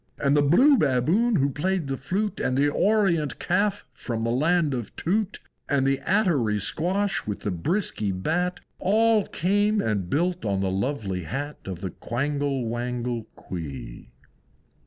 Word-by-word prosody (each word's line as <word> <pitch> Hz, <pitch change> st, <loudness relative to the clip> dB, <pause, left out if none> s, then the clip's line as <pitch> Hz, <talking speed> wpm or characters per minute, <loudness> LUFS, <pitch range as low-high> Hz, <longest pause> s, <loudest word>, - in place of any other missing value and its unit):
And 140 Hz, +1 st, +2 dB
the 145 Hz, -, +5 dB
Blue 250 Hz, -, +5 dB
Baboon 160 Hz, -, +2 dB
who 140 Hz, -4 st, +2 dB
played 180 Hz, +4 st, -1 dB
the 135 Hz, 0 st, -2 dB
flute, 205 Hz, +9 st, -2 dB
And 130 Hz, -, 0 dB
the 145 Hz, +1 st, +3 dB
Orient 170 Hz, -, +2 dB
Calf 200 Hz, +3 st, 0 dB
from 115 Hz, -3 st, -4 dB
the 115 Hz, -, 0 dB
Land 155 Hz, +3 st, +2 dB
of 120 Hz, -5 st, -5 dB
Tute, 200 Hz, +3 st, -1 dB, 0.3 s
And 140 Hz, -2 st, +2 dB
the 135 Hz, 0 st, +2 dB
Attery 160 Hz, -, +2 dB
Squash, 180 Hz, -, 0 dB
and 105 Hz, -, -3 dB
the 105 Hz, -, -3 dB
Bisky 105 Hz, -, -1 dB
Bat, 175 Hz, -, -1 dB, 0.2 s
All 215 Hz, +2 st, +3 dB
came 205 Hz, +4 st, +1 dB
and 100 Hz, -, -1 dB
built 175 Hz, -, 0 dB
on 100 Hz, -2 st, 0 dB
the 95 Hz, -1 st, 0 dB
lovely 95 Hz, -, -2 dB
Hat 145 Hz, -, -4 dB
Of 90 Hz, -2 st, -6 dB
the 95 Hz, -3 st, -4 dB
Quangle 140 Hz, +1 st, -2 dB
Wangle 120 Hz, 0 st, -3 dB
Quee. 70 Hz, -9 st, -7 dB
145 Hz, 155 wpm, -25 LUFS, 115-185 Hz, 0.3 s, the